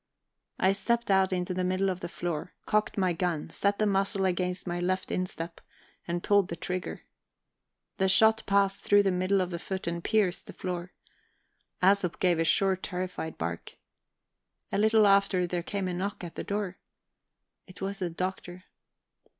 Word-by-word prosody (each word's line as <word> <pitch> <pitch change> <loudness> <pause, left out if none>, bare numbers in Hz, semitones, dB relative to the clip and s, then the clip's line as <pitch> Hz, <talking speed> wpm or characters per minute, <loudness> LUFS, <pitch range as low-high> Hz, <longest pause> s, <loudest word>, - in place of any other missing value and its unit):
I 190 - +4
stepped 235 +3 0
out 190 -1 +4
into 180 0 -1
the 185 0 -1
middle 185 +2 +1
of 180 - -5
the 175 - -5
floor, 170 -1 -4
cocked 215 0 +1
my 185 -3 +2
gun, 165 -2 -2
set 200 +4 +1
the 215 - +2
muzzle 195 0 +1
against 180 0 -1
my 175 -1 -2
left 185 +1 -1
instep, 170 -2 -4 0.5
and 175 0 -2
pulled 200 -2 +4
the 170 - -4
trigger. 180 +3 -4 0.9
The 190 -1 +2
shot 220 +3 +5
passed 195 0 +2
through 205 0 +5
the 195 - +2
middle 185 +2 +1
of 180 0 -2
the 170 - -3
foot 190 +2 -4
and 170 0 -3
pierced 200 -5 +1
the - - -9
floor. 180 0 -5 0.9
Æsop 190 -2 +3
gave 175 -3 +3
a - - +3
short 190 +3 +3
terrified 180 -3 -4
bark. 85 +1 -4 1.0
A 195 - 0
little 220 0 +5
after 195 -2 +4
there 175 0 -2
came 195 +2 -3
a 180 - -2
knock 190 +2 -3
at 170 - -6
the - - -5
door. 200 -3 -3 0.9
It 185 - -13
was 195 +1 -3
the 180 -2 -1
Doctor. 180 +1 -5
185 Hz, 175 wpm, -29 LUFS, 175-195 Hz, 1.0 s, shot